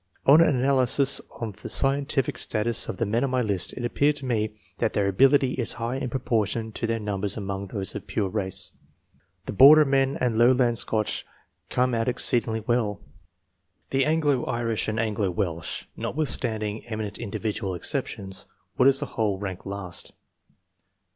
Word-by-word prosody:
On 150 Hz, +4 st, +7 dB
an 155 Hz, -4 st, +4 dB
analysis 135 Hz, +1 st, +2 dB, 0.2 s
of 110 Hz, -5 st, -6 dB
the -, -, -6 dB
scientific 135 Hz, 0 st, +2 dB
status 110 Hz, +1 st, 0 dB
of -, -, -4 dB
the 115 Hz, -, 0 dB
men 115 Hz, +4 st, 0 dB
on 135 Hz, -, 0 dB
my 125 Hz, -1 st, 0 dB
list, 100 Hz, -5 st, -1 dB
it 120 Hz, -, -5 dB
appeared 145 Hz, +5 st, +1 dB
to 140 Hz, -2 st, -5 dB
me 110 Hz, -4 st, -1 dB, 0.2 s
that -, -, 0 dB
their 100 Hz, -1 st, +1 dB
ability 135 Hz, +6 st, +3 dB
is 120 Hz, -, +1 dB
higher 120 Hz, +3 st, -3 dB
in 130 Hz, -, -3 dB
proportion 115 Hz, -3 st, -1 dB
to 115 Hz, -, -3 dB
their 115 Hz, 0 st, 0 dB
numbers 105 Hz, -2 st, -2 dB
among 100 Hz, -1 st, -4 dB
those 95 Hz, 0 st, -3 dB
of -, -, -7 dB
pure 105 Hz, -3 st, -1 dB
race. 95 Hz, -2 st, -1 dB, 0.7 s
The -, -, -5 dB
Border 150 Hz, +7 st, +8 dB
men 135 Hz, +1 st, +1 dB
and 120 Hz, -5 st, 0 dB
lowland 120 Hz, -1 st, +4 dB
Scotch 110 Hz, 0 st, -1 dB, 0.5 s
come 125 Hz, 0 st, +1 dB
out 115 Hz, -1 st, 0 dB
exceedingly 120 Hz, -2 st, +1 dB
well; 110 Hz, -3 st, -1 dB, 0.9 s
the 135 Hz, 0 st, +2 dB
Anglo 150 Hz, -4 st, +1 dB
Irish 115 Hz, -2 st, -2 dB
and 110 Hz, 0 st, -2 dB
Anglo 105 Hz, -3 st, 0 dB
Welsh, 85 Hz, -3 st, -3 dB
notwithstanding 110 Hz, -8 st, 0 dB
emi 110 Hz, -1 st, -3 dB
nent 100 Hz, -, -8 dB
individual 105 Hz, -3 st, -3 dB
exceptions, 95 Hz, -4 st, -3 dB, 0.3 s
would 125 Hz, -, +6 dB
as 135 Hz, +1 st, +5 dB
a -, -, -3 dB
whole 110 Hz, -6 st, -1 dB
rank 95 Hz, -2 st, -6 dB
last. 95 Hz, -3 st, -6 dB
115 Hz, 165 wpm, -25 LUFS, 105-130 Hz, 0.9 s, Border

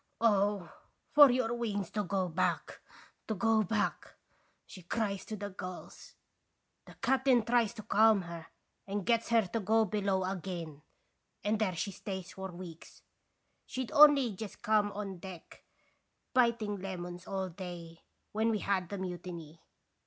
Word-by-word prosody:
"'Oh! 205 Hz, -4 st, +2 dB, 0.4 s
for 290 Hz, -2 st, +9 dB
your 245 Hz, -2 st, +1 dB
wings 210 Hz, -6 st, -2 dB
to 210 Hz, -, -1 dB
go 190 Hz, -1 st, -1 dB
back 175 Hz, +2 st, -1 dB, 0.5 s
to 220 Hz, -, -1 dB
go 220 Hz, +2 st, +3 dB
back! 215 Hz, +1 st, -1 dB, 0.2 s
' -, -, -40 dB
she 185 Hz, -, -11 dB
cries 200 Hz, +2 st, -2 dB
to 215 Hz, -, -5 dB
the 205 Hz, 0 st, -6 dB
gulls. 185 Hz, -1 st, -9 dB, 0.7 s
"The -, -, -14 dB
captain 260 Hz, -3 st, +4 dB
tries 235 Hz, -2 st, +2 dB
to 215 Hz, -, -8 dB
calm 215 Hz, -1 st, +4 dB
her, 170 Hz, -1 st, -8 dB, 0.4 s
and 200 Hz, -1 st, -3 dB
gets 230 Hz, +1 st, +2 dB
her 230 Hz, -3 st, +4 dB
to 190 Hz, +5 st, -2 dB
go 220 Hz, +2 st, +3 dB
below 195 Hz, -2 st, 0 dB
agin, 175 Hz, -5 st, -5 dB, 0.6 s
and 210 Hz, +1 st, +1 dB
there 195 Hz, -5 st, 0 dB
she 200 Hz, +4 st, -2 dB
stays 190 Hz, -1 st, -6 dB
for 190 Hz, -1 st, -6 dB
weeks. 175 Hz, -2 st, -11 dB, 0.6 s
She 260 Hz, 0 st, -3 dB
'd -, -, -13 dB
only 285 Hz, -5 st, +7 dB
just 205 Hz, +1 st, -8 dB
come 210 Hz, -1 st, +3 dB
on 195 Hz, -3 st, -5 dB
deck, 180 Hz, -2 st, -11 dB, 0.7 s
biting 235 Hz, -5 st, +2 dB
lemons 180 Hz, -2 st, -6 dB
all 190 Hz, -1 st, -2 dB
day, 170 Hz, -2 st, -8 dB, 0.3 s
when 220 Hz, +2 st, +1 dB
we 220 Hz, -, +1 dB
had 190 Hz, -3 st, -1 dB
the 200 Hz, -, -4 dB
mutiny. 175 Hz, -3 st, -7 dB
200 Hz, 150 wpm, -32 LUFS, 180-220 Hz, 0.7 s, for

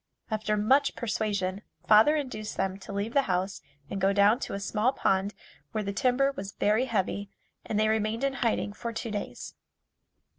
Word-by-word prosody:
After 215 Hz, 0 st, 0 dB
much 260 Hz, +8 st, +3 dB
persuasion, 205 Hz, -4 st, -1 dB, 0.3 s
father 220 Hz, +8 st, +7 dB
induced 230 Hz, -8 st, -4 dB
them 195 Hz, 0 st, -1 dB
to 195 Hz, -, -9 dB
leave 200 Hz, +3 st, -3 dB
the 280 Hz, -, +5 dB
house 185 Hz, +2 st, -1 dB, 0.3 s
and 195 Hz, -, -4 dB
go 195 Hz, +1 st, +3 dB
down 205 Hz, +4 st, +5 dB
to -, -, -4 dB
a -, -, -3 dB
small 215 Hz, +5 st, +1 dB
pond 195 Hz, -3 st, +1 dB, 0.4 s
where 215 Hz, -, -1 dB
the 200 Hz, 0 st, -3 dB
timber 260 Hz, +4 st, +2 dB
was 195 Hz, -6 st, -7 dB
very 215 Hz, +5 st, +2 dB
heavy 200 Hz, -3 st, -1 dB, 0.3 s
and 210 Hz, -, -1 dB
they 215 Hz, -, +3 dB
remained 220 Hz, +2 st, 0 dB
in 275 Hz, -1 st, +1 dB
hiding 225 Hz, -3 st, 0 dB
for 235 Hz, +3 st, -5 dB
two 230 Hz, 0 st, -4 dB
days. 205 Hz, -1 st, -5 dB
215 Hz, 180 wpm, -28 LUFS, 200-230 Hz, 0.4 s, father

